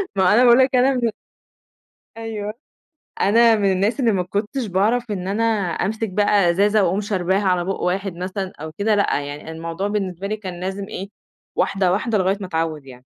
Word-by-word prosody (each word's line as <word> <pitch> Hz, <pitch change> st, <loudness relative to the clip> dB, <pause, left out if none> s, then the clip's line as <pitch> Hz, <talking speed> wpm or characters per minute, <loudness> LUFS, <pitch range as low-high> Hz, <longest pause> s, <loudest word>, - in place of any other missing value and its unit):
ما 190 Hz, -, +2 dB
هو -, -, +4 dB
أنا 230 Hz, +6 st, +5 dB
باقول 240 Hz, +1 st, +7 dB
لك 260 Hz, 0 st, +3 dB
أنا 255 Hz, +2 st, +4 dB
من 240 Hz, -2 st, 0 dB
ال -, -, -1 dB, 1.1 s
أيوه 215 Hz, -2 st, -5 dB, 0.7 s
أنا 230 Hz, +3 st, +5 dB
من 200 Hz, -2 st, +2 dB
الناس 200 Hz, +8 st, 0 dB
اللي 235 Hz, -3 st, +3 dB
ما 185 Hz, -3 st, 0 dB
كنتش 210 Hz, +7 st, -3 dB
باعرف 215 Hz, +5 st, 0 dB
إن 185 Hz, -2 st, -4 dB
أنا 210 Hz, +4 st, 0 dB, 0.3 s
أمسك 220 Hz, +1 st, -2 dB
بقى 205 Hz, -2 st, +3 dB
إزازة 205 Hz, +3 st, +3 dB
وأقوم 185 Hz, +4 st, +1 dB
شرباها 190 Hz, -1 st, 0 dB
على 180 Hz, -2 st, +1 dB
بُق 195 Hz, -, -3 dB
واحد 190 Hz, 0 st, -1 dB
مثلًا 185 Hz, +2 st, -4 dB
أو 160 Hz, +1 st, -6 dB
كده، 210 Hz, +1 st, +2 dB
لأ، 200 Hz, -7 st, +1 dB
يعني 145 Hz, +3 st, -7 dB
الموضوع 165 Hz, +4 st, -4 dB
بالنسبة 195 Hz, -2 st, -3 dB
لي 215 Hz, +1 st, -3 dB
كان 185 Hz, -4 st, -7 dB
لازم 195 Hz, +2 st, -4 dB
إيه 195 Hz, +2 st, -6 dB, 0.5 s
واحدة 190 Hz, -2 st, +1 dB
واحدة 215 Hz, +3 st, 0 dB
لغاية 190 Hz, +1 st, +1 dB
ما 185 Hz, -, -4 dB
أتعود 160 Hz, -4 st, -2 dB
يعني. 125 Hz, -1 st, -14 dB
195 Hz, 195 wpm, -21 LUFS, 180-215 Hz, 1.1 s, باقول